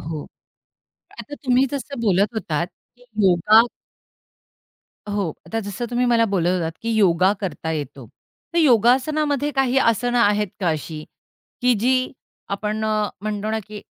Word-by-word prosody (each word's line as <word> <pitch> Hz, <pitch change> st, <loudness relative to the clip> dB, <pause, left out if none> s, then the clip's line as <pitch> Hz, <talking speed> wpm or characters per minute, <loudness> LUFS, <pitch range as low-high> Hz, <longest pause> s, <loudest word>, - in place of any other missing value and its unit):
हो. 155 Hz, -1 st, -6 dB, 0.9 s
आता 290 Hz, -, -8 dB
तुम्ही 255 Hz, 0 st, +4 dB
जसं 280 Hz, -2 st, -5 dB
बोलत 205 Hz, 0 st, +2 dB
होतात 170 Hz, -5 st, -2 dB, 0.3 s
की 245 Hz, -, -21 dB, 0.2 s
योगा, 200 Hz, +5 st, +6 dB, 1.5 s
हो, 200 Hz, -5 st, -1 dB, 0.2 s
आता 225 Hz, 0 st, -2 dB
जसं 205 Hz, +3 st, -5 dB
तुम्ही 245 Hz, +1 st, +1 dB
मला 230 Hz, -1 st, +4 dB
बोलत 175 Hz, -3 st, +1 dB
होतात, 165 Hz, -1 st, -2 dB
की 230 Hz, -, -2 dB
योगा 185 Hz, -2 st, +4 dB
करता 165 Hz, -4 st, -4 dB
येतो. 140 Hz, -5 st, -6 dB, 0.5 s
तर -, -, +3 dB
योगासनामध्ये 285 Hz, +3 st, +3 dB
काही 270 Hz, -1 st, +2 dB
आसनं 245 Hz, +1 st, +2 dB
आहेत 210 Hz, -2 st, +3 dB
का 180 Hz, -, +1 dB
अशी, 155 Hz, 0 st, -5 dB, 0.6 s
की 250 Hz, -1 st, +4 dB
जी 255 Hz, +5 st, +1 dB, 0.4 s
आपण 210 Hz, +2 st, -2 dB
अ, 215 Hz, -1 st, 0 dB
म्हणतो 210 Hz, 0 st, -3 dB
ना 220 Hz, -, 0 dB
की 210 Hz, 0 st, -9 dB
215 Hz, 140 wpm, -22 LUFS, 185-245 Hz, 1.5 s, योगा